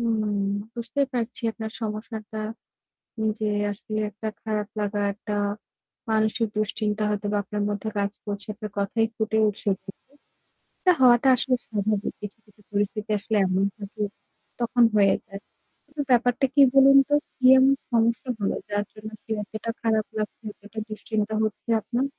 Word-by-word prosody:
উম 215 -3 0 0.3
বুঝতেই 240 +4 -1
পারছি 240 +1 -2
আপনার 220 -1 -6
সমস্যাটা। 215 0 -5 1.0
যে 215 - 0 0.2
আসলে 215 +1 -4
একটা 215 +1 -7 0.2
খারাপ 210 -2 -1
লাগা 205 0 -1
একটা, 210 +1 -6 0.8
মানসিক 220 +1 +2
দুশ্চিন্তা 215 0 -1
হয়তোবা 205 0 -1
আপনার 205 +1 -3
মধ্যে 205 +1 -2
কাজ 200 0 0
করছে 205 0 -1
আপনার 215 -1 -7
কথায়ই 225 +3 +1
ফুটে 220 0 0
উঠেছে। 205 0 -1 1.1
এটা 365 - +4
হওয়াটা 245 +1 +6
আসলে 255 +1 +2
স্বাভাবিক। 210 -1 -1
কিছু, 205 0 -7
কিছু 210 0 -24
পরিস্থিতি 205 +1 -1
আসলে 220 +1 -2
এমন 185 +1 +1
থাকে 210 +1 -8 0.6
তখন 240 0 +3
হয়ে 200 -2 +5
যায়। 195 0 -8 0.5
কিন্তু 295 0 -5
ব্যাপারটা 245 +2 +3
কি 285 - +7
বলুন 275 0 +8
তো? 290 - +1 0.2
কি 255 - -2
এমন 265 +1 +6 0.2
সমস্যা 230 +2 +2
হলো 200 - 0
যার 205 0 0
জন্য 215 0 -8
কি - - -37
এতটা 220 +2 -5
খারাপ 220 -2 +2
লাগছে 215 +2 -4
এতটা 205 +2 -9
দুশ্চিন্তা 215 0 -2
হচ্ছে 215 +2 -4
আপনার? 245 +5 -1
215 Hz, 145 wpm, -25 LUFS, 205-230 Hz, 1.1 s, বলুন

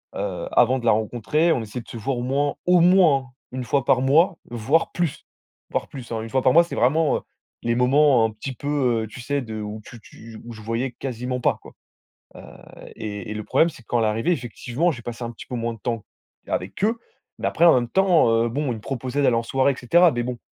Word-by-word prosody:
heu, - - -4
avant 125 +2 +3
de 120 - -8
la - - +5
rencontrer, 120 +9 +1
on 120 - -1
essayait 110 +3 -6
de - - -17
se 115 - -7
voir 125 +3 -2
au - - -3
moins, 140 +3 0
au 180 -1 +5
moins 175 -5 +5
hein, 130 - -12 0.3
1 130 -1 -3
fois 135 +3 +1
par 125 - +3
mois, 160 +7 +3
voire 120 +8 +1
plus, 170 -5 -3 0.5
voire - - -2
plus, 130 -4 -9
hein, 110 -1 -2
1 115 - -7
fois 130 +1 +1
par 130 - +4
mois, 170 +1 +7
c'est 170 - -7
vraiment, 150 +6 +2
heu, - - -7 0.4
les 115 0 0
moments 130 0 +4
un 110 - -1
petit 130 +5 -7
peu, 130 -5 0
heu, - - -10
tu 115 +3 -10
sais, 140 +2 -1
de 110 -2 -6
où 105 +1 -6
tu 120 -3 -12
tu 110 0 -13
où 120 - -8
on - - -7
se 110 - -11
voyait 115 +4 -2
quasiment 125 0 -4
pas - - +1
quoi. - - -14 0.6
Heu, - - -10 0.6
et 105 -2 -6
et - - -4
le 105 -1 -5
problème, 165 - +3
c'est 125 - -15
quand 120 - -1
elle 110 - +2
est - - +2
arrivée, 115 +11 0
effectivement, 125 - -1
j'ai 120 - -9
passé 120 +1 -6
un 115 - -4
petit - - -12
peu 125 - -5
moins 115 0 -2
de - - -14
temps 115 -3 -3 0.4
avec 95 - -3
eux. 225 +2 +1 0.4
Mais - - 0
après, 170 - +1
en 170 - +8
même 120 -2 +1
temps, 185 -6 +3 0.2
heu, - - 0
bon, 145 +3 -2
ils - - -5
me - - -10
proposaient 130 +3 -3
d'aller 125 - +3
en 115 - +1
soirée, 135 +3 +2
et - - -9
cetera. 170 +7 +4
Mais 120 0 -1
bon, 125 -1 -4
125 Hz, 255 wpm, -23 LUFS, 115-145 Hz, 0.6 s, en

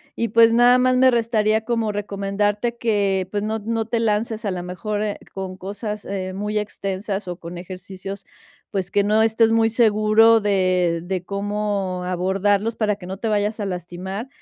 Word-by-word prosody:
y, 230 - -1
pues, 230 +1 +6
nada 245 +1 +6
más 255 0 +3
me 260 +1 +6
restaría 220 -2 +2
como 230 -3 0
recomendarte 205 +3 -1
que, 200 -5 +1
pues, 205 -1 -1
no 220 +1 -2
no 225 +1 -2
te 230 0 -1
lances, 220 0 -1
a 200 - 0
la 180 -1 -3
mejor, 205 +4 -4
eh, 210 -1 -2 0.2
con 190 -1 -5
cosas, 205 +2 -5
eh, 185 -1 -4
muy 210 +2 -2
extensas 195 -1 -4
o 175 - -4
con 170 0 -8
ejercicios, 185 +2 -8 0.4
pues, 190 -3 -3
que 200 - +3
no 215 +2 +3
estés 225 0 +3
muy 225 0 +3
seguro 225 0 +4
de 185 -4 +1
de 185 0 -3
cómo 200 -2 -2
abordarlos 195 +4 0
para 210 -2 +1
que 195 -3 -12
no 190 +1 -5
te 225 - -3
vayas 210 +1 0
a 205 - -2
lastimar, 185 +4 -5
205 Hz, 180 wpm, -22 LUFS, 190-220 Hz, 0.4 s, pues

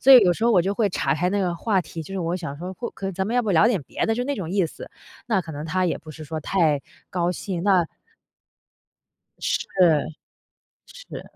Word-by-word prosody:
所 270 - +7
以 260 - +12
有 175 - +4
时 220 - -2
候 235 - +5
我 185 - +6
就 195 +3 -1
会 210 -1 +2
岔开 160 +3 0
那 200 +1 +1
个 180 -2 0
话 195 +2 +1
题， 165 -2 -7
就 175 - -10
是 - - -2
我 170 +1 -1
想 150 -6 -5
说 180 +3 -6
或 235 +5 -5
可 195 0 -5
咱 190 +2 -1
们 225 - -2
要 - - +5
不 215 - -1
聊 170 +5 +6
点 205 -10 0
别 - - -2
的， 225 - +2
就 245 - -1
那 285 +2 -1
种 170 -5 -4
意 190 -2 +2
思， - - -10 0.4
那 215 -5 +2
可 165 -2 -8
能 145 +1 -5
他 185 +3 +1
也 170 - 0
不 155 - -12
是 155 0 -9
说 155 +1 -4
太 155 -4 +2 0.3
高 175 -1 0
兴， 180 -1 -4
那 185 -4 +4 1.5
是。 - - 0 1.2
是。 - - -9
180 Hz, 255 characters per minute, -24 LUFS, 165-205 Hz, 1.5 s, 以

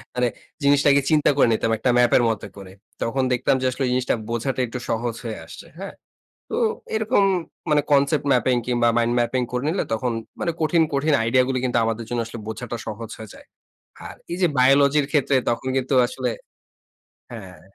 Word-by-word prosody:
মানে 125 0 +2 0.4
জিনিসটাকে 140 0 +4
চিন্তা 155 -2 +3
করে 140 - +5
নিতাম 115 +1 0
একটা 125 +4 0
ম্যাপের 120 0 +4
মতো 110 - -3
করে। 95 -1 -10 0.3
তখন 130 +3 -1
দেখতাম 125 +2 +1
যে, - - -1
আসলে 135 - -3
এই 125 - -1
জিনিসটা 130 0 +1
বোঝাটা 120 +3 -2
একটু 125 +2 -6
সহজ 115 0 -1
হয়ে 115 -2 -5
আসছে। - - -11
হ্যাঁ? 195 0 -7 0.5
তো - - -3 0.4
এরকম 220 -1 +2 0.5
মানে 150 -1 +4
concept 145 +1 +3
mapping 125 -1 +2
কিংবা 120 -1 +2
mind 120 0 +2
mapping 125 +1 0
করে 125 +1 -2
নিলে 180 +4 0
তখন 120 +2 -1 0.3
মানে 170 - 0
কঠিন, 160 +2 +3
কঠিন 145 +2 +1
আইডিয়া 130 +3 +3
গুলি 130 -1 -1
কিন্তু 120 -1 0
আমাদের 115 0 -3
জন্য 120 -1 -2
আসলে 115 0 -8
বোঝাটা 115 +2 -5
সহজ 110 +1 -6
হয়ে 110 -1 -10
যায়। - - -16 0.6
আর - - -10 0.2
এই 175 - -3
যে, 180 - +5
বায়োলজির 140 +2 +4
ক্ষেত্রে 145 -2 +2
তখন 120 +2 -2
কিন্তু 130 +1 -1
আসলে 125 -1 -3 1.0
হ্যাঁ। 95 -6 -10
125 Hz, 185 wpm, -22 LUFS, 115-140 Hz, 1.0 s, করে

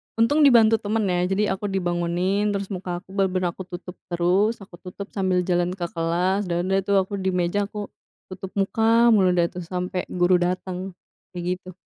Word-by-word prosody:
untung 230 +7 +3
dibantu 225 -4 +6
temen, 215 +2 -1
ya. 175 - +1
Jadi 195 +3 +1
aku 200 +2 -3
dibangunin, 185 +2 0
terus 200 +1 -4
muka 180 -1 -4
aku - - -39
bener-bener 185 -2 0
aku 190 - -8
tutup 180 0 -8
terus, 185 +6 +2
aku 185 - -14
tutup 195 +2 -9
sambil 185 -2 0
jalan 175 0 0
ke 185 - -6
kelas, 180 +4 0
dan 175 0 -1
udah 195 - +3
tuh, 200 - +3
aku 190 - -11
di 190 - 0
meja, 180 +3 0
aku 210 -1 -7 0.4
tutup 185 0 -7
muka 225 +4 +3
mulu 185 -4 +4
dah 175 - +3
tuh, 180 - -7
sampai 180 +1 -3
guru 180 0 +2
datang, 180 +1 -3 0.4
kayak 180 +1 -2
gitu. 185 -1 -12
185 Hz, 185 wpm, -24 LUFS, 180-200 Hz, 0.4 s, dibantu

